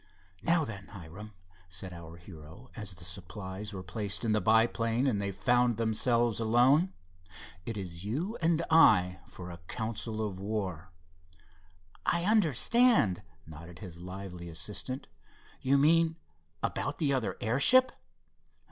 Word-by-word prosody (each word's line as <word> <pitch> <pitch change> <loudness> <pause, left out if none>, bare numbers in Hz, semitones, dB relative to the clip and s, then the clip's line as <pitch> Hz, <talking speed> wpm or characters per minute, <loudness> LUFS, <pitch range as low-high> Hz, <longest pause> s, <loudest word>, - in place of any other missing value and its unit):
"Now 165 -2 +2
then, 100 -3 -8
Hiram," 100 +4 -11 0.4
said 90 +1 -4
our 85 -1 -10
hero, 85 +6 -13
as 105 -5 -6
the 85 - -11
supplies 95 +3 -6
were 95 -2 -7
placed 100 +4 -2
in 110 - +1
the 110 0 +2
biplane 115 +2 +2
and 110 -7 +1
they 100 0 -2
found 120 +4 +2
themselves 115 0 +1
alone, 125 +10 +4 0.8
"it 115 -2 -3
is 90 -3 -6
you 155 - -3
and 165 0 +2
I 95 - +5
for 90 -1 -9
a 85 - -10
council 110 -1 -3
of 95 -2 -8
war." 95 -4 -4 1.1
"I 170 0 +1
understand," 210 - +3 0.2
nodded 80 +2 -11
his 85 -3 -9
lively 90 -1 -8
assistant—"you 130 - -4
mean 165 +3 +4 0.5
about 145 +2 -2
the 145 -3 +1
other 130 -5 -1
airship?" 140 - +5
110 Hz, 130 wpm, -30 LUFS, 90-130 Hz, 1.1 s, I